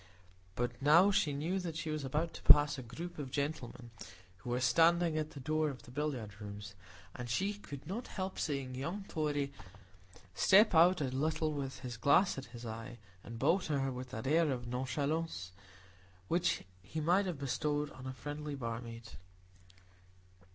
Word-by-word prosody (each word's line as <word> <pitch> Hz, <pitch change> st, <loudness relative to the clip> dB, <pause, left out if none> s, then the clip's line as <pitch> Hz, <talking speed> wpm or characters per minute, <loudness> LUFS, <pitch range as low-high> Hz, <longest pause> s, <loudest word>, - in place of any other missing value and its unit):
But 120 Hz, +1 st, -2 dB
now 170 Hz, +8 st, +6 dB
she 155 Hz, -6 st, +2 dB
knew 160 Hz, +7 st, -1 dB
that 170 Hz, -3 st, -4 dB
she 160 Hz, -1 st, -3 dB
was 155 Hz, -1 st, -2 dB
about 150 Hz, +5 st, -1 dB
to -, -, -9 dB
pass 145 Hz, 0 st, +7 dB
a 135 Hz, -, -6 dB
group 165 Hz, +9 st, -7 dB
of 140 Hz, -3 st, -4 dB
gentlemen, 130 Hz, -4 st, -4 dB, 0.5 s
who 90 Hz, -, -8 dB
were 120 Hz, +1 st, 0 dB
standing 165 Hz, +6 st, +4 dB
at 155 Hz, -1 st, -1 dB
the 140 Hz, -, -8 dB
door 155 Hz, +3 st, 0 dB
of 135 Hz, -3 st, -8 dB
the 120 Hz, -, -13 dB
billiard 125 Hz, -8 st, -3 dB
rooms, 105 Hz, 0 st, -7 dB, 0.4 s
and 120 Hz, 0 st, -6 dB
she 195 Hz, -, +1 dB
could 145 Hz, -9 st, -9 dB
not 205 Hz, +9 st, -4 dB
help 190 Hz, -1 st, -4 dB
seeing 140 Hz, -4 st, -2 dB
young 170 Hz, +10 st, -4 dB
Torry 145 Hz, -3 st, -1 dB, 0.8 s
step 200 Hz, -, +6 dB
out 175 Hz, +1 st, +6 dB
a 130 Hz, -3 st, -1 dB
little 155 Hz, +3 st, 0 dB
with 135 Hz, -2 st, -4 dB
his 120 Hz, -2 st, -6 dB
glass 140 Hz, -, +4 dB
at 135 Hz, -, -8 dB
his 120 Hz, 0 st, -10 dB
eye, 115 Hz, +1 st, -6 dB, 0.3 s
and 115 Hz, 0 st, -8 dB
bow 160 Hz, +10 st, +3 dB
to 155 Hz, -6 st, -1 dB
her 135 Hz, 0 st, 0 dB
with 125 Hz, 0 st, -6 dB
that 120 Hz, -1 st, -6 dB
air 160 Hz, +3 st, +3 dB
of 125 Hz, -2 st, -3 dB
nonchalance 130 Hz, -, -2 dB, 0.8 s
which 175 Hz, +1 st, +1 dB, 0.2 s
he 105 Hz, -, -5 dB
might 180 Hz, +6 st, +3 dB
have 175 Hz, -5 st, -3 dB
bestowed 145 Hz, +2 st, -1 dB
on 130 Hz, 0 st, -9 dB
a 130 Hz, -, -4 dB
friendly 145 Hz, +2 st, -5 dB
barmaid. 115 Hz, -2 st, -5 dB
145 Hz, 175 wpm, -34 LUFS, 125-160 Hz, 0.8 s, pass